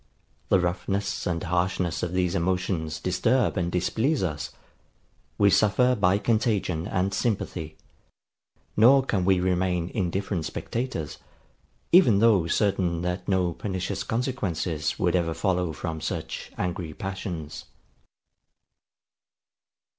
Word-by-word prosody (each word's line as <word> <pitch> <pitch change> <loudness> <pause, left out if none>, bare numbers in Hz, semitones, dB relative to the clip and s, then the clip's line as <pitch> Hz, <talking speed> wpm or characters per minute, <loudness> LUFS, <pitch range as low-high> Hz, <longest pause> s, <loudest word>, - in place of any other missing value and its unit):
The 95 - +5
roughness 100 +4 -2
and 85 -2 -1
harshness 90 -1 0
of 85 - -2
these 90 -1 0
emotions 85 -2 -1
disturb 110 +7 +1
and 85 -3 -1
displease 110 - 0
us: 75 -6 -3 0.9
we 100 -1 +5
suffer 115 +6 +4
by 95 -3 +3
contagion 100 -6 0
and 95 +2 0
sympathy; 90 -7 -2 1.0
nor 130 +5 +6
can 95 -8 0
we 95 -1 +4
remain 90 -1 0
indifferent 95 -3 -1
spectators, 115 - -4 0.7
even 170 - +6
though 100 -6 +4
certain 90 -3 +1
that 90 +1 -3
no 90 -3 +1
pernicious 95 +1 -3
consequences 100 - -2
would 90 0 +1
ever 85 -2 0
follow 90 -4 0
from 80 +1 -5
such - - -4
angry 90 -3 -3
passions. 90 -5 -5
90 Hz, 110 wpm, -26 LUFS, 85-100 Hz, 1.0 s, nor